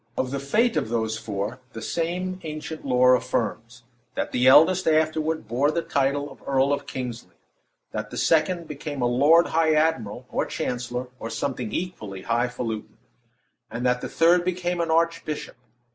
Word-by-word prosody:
Of 130 - -1
the 140 - -2
fate 215 - +1
of 135 -7 -1
those 110 -1 -1
four, 105 +2 -4
the 110 - -7
same 180 +5 -2
ancient 155 0 -6
lore 125 -1 +5
affirms: 120 -1 -2 0.3
"That - - -2
the 125 +1 +2
eldest 165 +7 +6
afterward 155 -3 +1
bore 130 +6 +2
the 165 +2 -1
title 140 +1 0
of - - -15
Earl 135 +1 +2
of 145 0 -3
Kingsley; 125 -2 -6 0.6
that 110 0 -4
the - - -7
second 170 +1 +2
became 145 -2 -5
a - - +3
lord 145 +8 +5
high 160 -1 +3
admiral, 150 -10 0
or - - -1
chancellor, 125 +1 -3
or 115 - -5
something 125 -1 -3
equally 105 - -5
highfalutin; 115 -2 -2 0.7
and 120 +2 -4
that 125 0 +2
the - - -5
third 170 +2 +4
became 175 -1 -1
an 165 - -1
archbishop. 165 -4 -1
140 Hz, 160 wpm, -25 LUFS, 120-160 Hz, 0.7 s, eldest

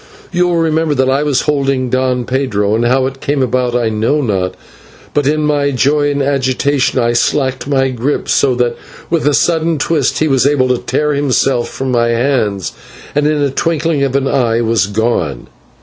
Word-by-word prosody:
You 180 0 +1
will 175 -1 0
remember 160 -2 +1
that 130 0 +2
I 135 +2 +1
was 145 -3 +1
holding 135 -4 0
Don 130 -1 0
Pedro, 110 -6 -1
and 115 +2 +1
how 130 +1 +2
it 135 0 -5
came 140 -1 0
about 125 -1 0
I 120 -2 +1
know 110 +7 0
not, 95 -9 -1 0.6
but 145 -2 +1
in 155 +1 +1
my 145 -1 +1
joy 145 +2 +1
and 140 -1 -1
agitation 135 0 0
I 120 -1 +2
slackened 130 +2 0
by 135 -1 +2
grip, 130 +4 -2
so 130 -3 +2
that 120 -1 0 0.4
with 165 -3 +1
a 145 - +3
sudden 165 -1 +1
twist 145 -1 0
he 155 - +1
was 135 -2 +2
able 135 -3 +2
to 125 - +1
tear 150 0 -1
himself 135 -3 0
from 135 -1 -4
my 120 -1 +2
hands, 115 -5 0 0.4
and 145 0 +1
in 150 -1 +1
a 140 - 0
twinkling 160 0 0
of 135 -1 0
an 135 0 +1
eye 120 -4 +1
was 115 -3 +1
gone. 100 - -1
135 Hz, 195 wpm, -14 LUFS, 120-145 Hz, 0.6 s, a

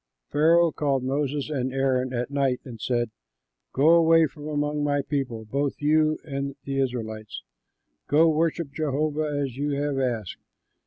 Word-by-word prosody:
Pharaoh 165 +2 +4
called 140 -4 0
Moses 140 +2 -1
and 130 -3 -1
Aaron 130 -1 0
at 125 +1 -3
night 135 -3 +1
and 115 -5 -9
said, 120 -3 0 0.6
"Go 140 +4 +3
away 165 -1 +6
from 150 0 -8
among 150 0 -1
my 145 -1 +1
people, 125 -6 -3
both 140 +5 -1
you 155 +1 +3
and 140 -2 -4
the 135 0 -2
Israelites; 110 - -3 0.6
go, 155 +3 +5
worship 160 -1 0
Jehovah 155 0 -1 0.2
as 130 -3 -4
you 145 +1 -1
have 145 -2 -1
asked. 120 -7 -2
140 Hz, 150 wpm, -25 LUFS, 130-150 Hz, 0.6 s, away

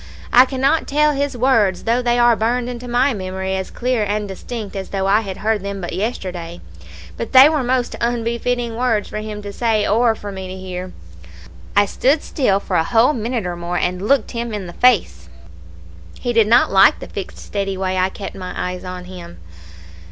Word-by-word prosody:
I 250 +1 +8
cannot 270 +4 0
tell 300 +1 +3
his 280 -2 -2
words, 225 -7 +2
though 235 +2 +1
they 240 -1 +1
are 240 -1 +5
burned 240 +3 0
into 245 0 -6
my 250 +3 +2
memory 190 -1 -3
as 190 0 -4
clear 250 -2 -1
and 210 0 -2
distinct 205 +2 -7
as 195 -1 -5
though 195 -1 -2
I 200 +3 +3
had 195 -3 -6
heard 215 -1 0
them 200 0 -5
but 175 - -5
yesterday, 180 -4 -4 0.6
but - - -5
they 260 +2 +10
were 305 -2 +1
most 250 0 0
unbefitting 235 0 -1
words 230 -4 0
for 215 - -4
him 210 -1 -6
to 205 0 -7
say 220 -2 +1
or 225 +2 +3
for 205 -1 -7
me 190 -1 -7
to 185 - -7
hear. 185 -1 -6 0.8
"I 205 0 +5
stood 275 +9 +1
still 205 -9 +1
for 185 -2 -2
a 165 - +3
whole 235 - +3
minute 230 -3 -2
or 175 -1 -3
more, 175 +1 -3
and 180 +1 -1
looked 275 -5 +2
him 235 -2 -4
in 200 -3 -5
the 175 - -9
face. 250 -1 +2 0.9
He 245 - -2
did 225 -2 +4
not 235 +3 +4
like 195 0 +6
the - - -8
fixed 195 - -7
steady 195 -2 -4
way 185 0 -1
I 185 +1 +2
kept 195 0 -7
my 185 -1 -7
eyes 180 0 -4
on 180 -1 -7
him. 180 - -10
215 Hz, 205 wpm, -19 LUFS, 190-245 Hz, 0.9 s, they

